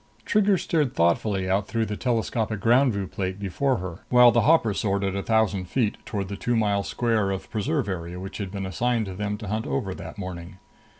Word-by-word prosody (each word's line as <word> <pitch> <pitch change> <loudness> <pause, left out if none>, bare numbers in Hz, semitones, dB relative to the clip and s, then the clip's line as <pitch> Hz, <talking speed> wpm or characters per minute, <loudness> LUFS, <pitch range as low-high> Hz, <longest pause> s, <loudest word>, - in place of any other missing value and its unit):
Trigger 205 -2 +3
stared 150 -7 0
thoughtfully 95 +3 +1
out 100 +2 +1
through 115 -1 0
the 105 - -4
telescopic 115 -2 -1
ground 125 +5 +4
view 100 -2 -2
plate 95 0 -4
before 125 +7 0
her, 90 -1 -6
while 125 -1 +7
the 120 +1 +3
hopper 145 -9 +4
soared 100 0 0
at 95 -1 -1
a 100 - -1
thousand 105 -4 +1
feet 110 +3 0
toward 100 -4 -3
the 100 - -5
two 120 +4 -1
mile 105 -3 +2
square 110 -2 0
of 95 -1 -4
preserve 100 -4 -1
area 90 -2 -4
which 95 +3 -7
had 100 -2 -3
been 100 0 -4
assigned 115 +5 0
to 95 - -6
them 105 +2 -3
to 105 - -8
hunt 110 0 -2
over 70 -1 -2
that - - -9
morning. 90 -1 -7
100 Hz, 215 wpm, -25 LUFS, 95-115 Hz, -, while